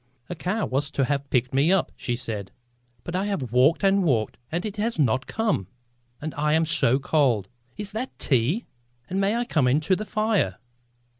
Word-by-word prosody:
"A - - -3
car 190 +6 -1
was 140 +2 -1
to 135 - +3
have 140 0 -2
picked 125 0 +1
me 140 +6 +3
up," 195 - +2
she 120 - -2
said, 110 -5 -4 0.5
"but 175 - -5
I 190 +2 0
have 170 - -3
walked 135 +9 +4
and 195 0 +4
walked 115 - +1 0.2
and 175 +4 -2
it 215 0 -5
has 225 +3 -1
not 130 -4 +1
come. 215 - -1 0.5
And 155 +1 -5
I 150 +1 +1
am 160 +1 +3
so 130 -5 +3
cold. 135 -8 +1 0.3
Is 205 -1 -4
that 230 +5 -5
tea? 140 - +1 0.5
And 190 +1 0
may 200 +3 +2
I 240 +1 0
come 140 - +2
to 175 +5 +2
the 215 - -4
fire?" 215 - 0
155 Hz, 195 wpm, -25 LUFS, 130-200 Hz, 0.5 s, walked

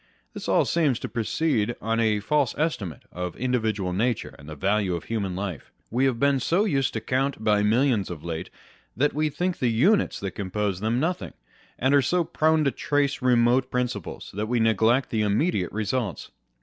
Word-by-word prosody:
This - - -6
all - - +4
seems 150 -8 +2
to - - -5
proceed 120 -1 0
on 115 +1 -1
a 110 -2 +2
false 145 +3 +1
estimate 125 - -2
of 90 0 -5
individual 110 -7 -1
nature 115 +4 -1
and 75 +2 -12
the 75 - -7
value 95 +3 +1
of 85 - -5
human 100 -5 -3
life. 95 -5 -5 0.2
We 125 +4 +2
have 125 -4 +1
been 140 0 +3
so 175 - +1
used 135 - 0
to 110 - -3
count 135 -1 -1
by 105 -1 +3
millions 110 -1 +2
of 85 -4 -7
late, 80 -1 -5 0.5
that 145 +4 +2
we 155 +1 +1
think 180 +4 -2
the 125 - +2
units 175 - +2
that 100 -1 -3
compose 100 0 -2
them 110 +4 0
nothing; 175 +5 -2 0.4
and 130 +3 +2
are 140 - +6
so 175 +6 +1
prone 160 0 +2
to 140 - +2
trace 145 0 0
remote 125 +1 +3
prin 125 -1 +1
ciples, 105 -7 -7
that 105 +3 -3
we 120 +1 +1
neglect 115 +3 +2
the 110 - +1
immediate 105 - +1
results. 110 -1 -3
115 Hz, 190 wpm, -25 LUFS, 105-140 Hz, 0.5 s, are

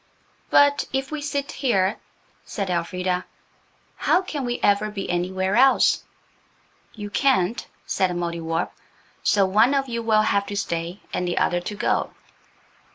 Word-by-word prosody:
"But 285 0 +4
if 270 +1 -2
we 305 -1 -3
sit 285 -1 -3
here," 200 -7 +1 0.5
said 195 -4 -4
Elfrida, 180 +1 -1 0.7
"how 375 - +2
can 290 -7 -4
we 240 0 -2
ever 205 +1 +3
be 200 -2 -5
anywhere 190 +2 -1
else?" 265 +2 +4 0.9
"You 205 -2 -7
can't," 235 -5 +1 0.2
said 185 - +1
the 180 - -3
Mouldiwarp. 170 -1 -2 0.5
"So 200 -2 +3
one 215 +8 +4
of 275 -1 0
you 235 -1 -2
will 220 -1 +3
have 200 -2 +1
to 205 - -4
stay 170 0 -3
and 180 - -1
the 175 - -2
other 175 0 +1
to 205 +4 -5
go." - - 0
200 Hz, 150 wpm, -23 LUFS, 180-250 Hz, 0.9 s, But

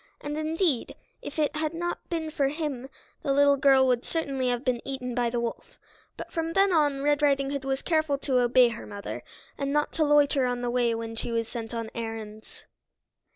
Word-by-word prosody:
And 290 0 -5
indeed, 310 -3 0 0.3
if 290 - -8
it 305 -1 +1
had 310 +1 -1
not 345 +1 -4
been 320 -2 -2
for 280 -3 +1
him 280 -3 -4 0.3
the 280 - -1
little 285 0 +5
girl 270 -1 +5
would 250 -1 +2
certainly 275 -6 -1
have 245 +1 -1
been 250 -2 0
eaten 255 -2 -4
by 240 -1 +1
the 240 0 -1
wolf. 235 -1 -5 0.4
But - - -8
from 330 -1 -2
then 390 0 +4
on 290 -4 +2
Red 290 0 +2
Riding 275 -1 +2
Hood 280 -1 -3
was 270 0 -1
careful 310 -3 +1
to 265 -2 +1
obey 245 0 +5
her 230 0 -7
mother, 205 -1 -6 0.4
and 275 -1 -1
not 295 +1 +1
to 320 - +1
loiter 290 -3 +4
on 245 0 -2
the 240 - 0
way 240 -2 +2
when 225 0 -5
she 230 - -3
was 230 -1 -1
sent 230 -2 -6
on 230 -1 -4
errands. 220 -2 -7
275 Hz, 205 wpm, -27 LUFS, 240-295 Hz, 0.4 s, little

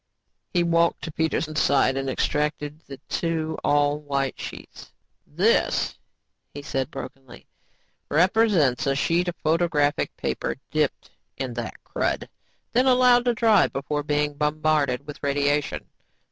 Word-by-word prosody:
He 175 -2 +2
walked 170 0 +2
to 160 - -4
Peterson's 155 0 -1
side 135 -1 +3
and 135 0 -2
extracted 150 +2 -1
the 135 - -8
two 160 -2 -2
all 145 0 +2
white 140 -2 -2
sheets. - - -9 0.4
"This," - - +1 0.6
he 145 - -7
said 135 -3 -2
brokenly, 135 -2 -10 0.6
"represents 175 - +3
a 135 - +2
sheet 170 +5 +1
of 175 - -2
photographic 155 -2 +1
paper - - -2 0.2
dipped - - -1 0.3
in 130 -3 -3
that 115 -1 -5
crud - - -1
and - - -15 0.4
then 255 +2 +3
allowed 250 -1 +5
to 240 -1 +2
dry 220 -2 +4
before 145 +2 -3
being 150 0 0
bombarded 150 -3 0
with 150 -1 -9
radiation. 145 0 0
150 Hz, 130 wpm, -24 LUFS, 140-170 Hz, 0.6 s, allowed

